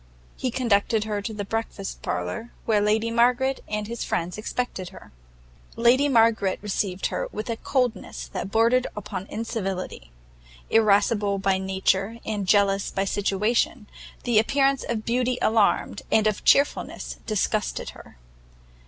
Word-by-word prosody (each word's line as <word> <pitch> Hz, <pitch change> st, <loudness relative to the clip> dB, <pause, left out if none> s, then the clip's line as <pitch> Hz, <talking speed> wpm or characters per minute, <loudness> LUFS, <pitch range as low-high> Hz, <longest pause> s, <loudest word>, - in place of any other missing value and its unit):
He 255 Hz, -, -2 dB
conducted 225 Hz, -3 st, +1 dB
her 210 Hz, -1 st, -2 dB
to 210 Hz, -, -4 dB
the 205 Hz, -2 st, -5 dB
breakfast 225 Hz, -2 st, -4 dB
parlour, 90 Hz, -, -3 dB
where 215 Hz, -2 st, +3 dB
Lady 220 Hz, +2 st, +1 dB
Margaret 250 Hz, +3 st, +2 dB
and 210 Hz, 0 st, -2 dB
his 235 Hz, +2 st, -4 dB
friends 170 Hz, +1 st, -2 dB
expected 215 Hz, -4 st, -4 dB
her. 190 Hz, -, -14 dB, 0.6 s
Lady 255 Hz, +5 st, +4 dB
Margaret 225 Hz, -6 st, +3 dB
received 195 Hz, -2 st, -2 dB
her -, -, -2 dB
with 215 Hz, +3 st, -4 dB
a 225 Hz, -, -3 dB
coldness 250 Hz, -3 st, -2 dB
that -, -, -4 dB
bordered 230 Hz, +4 st, +3 dB
upon 190 Hz, -1 st, -5 dB
incivility; 195 Hz, -, -4 dB, 0.6 s
irascible 205 Hz, -1 st, +3 dB
by 195 Hz, -1 st, +1 dB
nature 190 Hz, +3 st, 0 dB
and 205 Hz, -3 st, -3 dB
jealous 200 Hz, 0 st, +3 dB
by 195 Hz, -, -1 dB
situation, 210 Hz, +4 st, 0 dB, 0.4 s
the 235 Hz, -3 st, +4 dB
appearance 275 Hz, +4 st, +2 dB
of 220 Hz, -2 st, -3 dB
beauty 250 Hz, +1 st, +1 dB
alarmed, 220 Hz, -2 st, +2 dB
and 220 Hz, -, +4 dB
of 215 Hz, -2 st, 0 dB
chearfulness 280 Hz, +1 st, +2 dB
disgusted 215 Hz, -1 st, -1 dB
her. -, -, -15 dB
215 Hz, 135 wpm, -25 LUFS, 200-235 Hz, 0.6 s, Lady